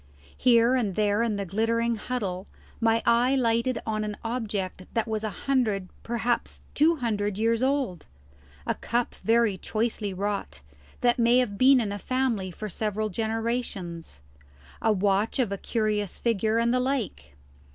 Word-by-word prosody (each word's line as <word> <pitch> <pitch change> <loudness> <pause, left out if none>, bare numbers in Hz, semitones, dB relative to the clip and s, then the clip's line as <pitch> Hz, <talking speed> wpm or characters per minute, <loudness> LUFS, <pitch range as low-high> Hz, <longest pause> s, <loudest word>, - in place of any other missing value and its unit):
Here 235 0 +4
and 220 -8 0
there 210 0 +2
in 230 -3 +1
the 200 -1 -3
glittering 230 +4 0
huddle 205 -5 -4 0.3
my 225 0 +2
eye 240 +3 +4
lighted 235 -1 +1
on 215 -1 -1
an 210 -1 -4
object 210 -6 -3
that 230 0 +1
was 220 -1 -2
a 215 - -1 0.2
hundred, 215 -9 +1
perhaps 235 +1 -2
two 320 +3 +4
hundred, 210 -7 -1
years 225 +1 +1
old: 260 - 0 0.6
a - - +1
cup 240 0 -2
very 225 -4 +3
choicely 215 -1 -2
wrought, 200 - -3 0.4
that 245 0 +3
may 235 +1 +5
have 245 -5 +1
been 260 +4 +6
in 215 -4 -1
a 205 - -4
family 250 -6 -1
for 215 +4 -6
several 215 +2 -2
generations; 220 - -3 0.6
a 220 - +3
watch 200 +1 +1
of 245 -6 +1
a 200 - -2
curious 215 -4 -1
figure, 225 -1 +1
and 235 +1 +2
the 255 - +2
like. 230 - -2
225 Hz, 155 wpm, -27 LUFS, 205-240 Hz, 0.6 s, been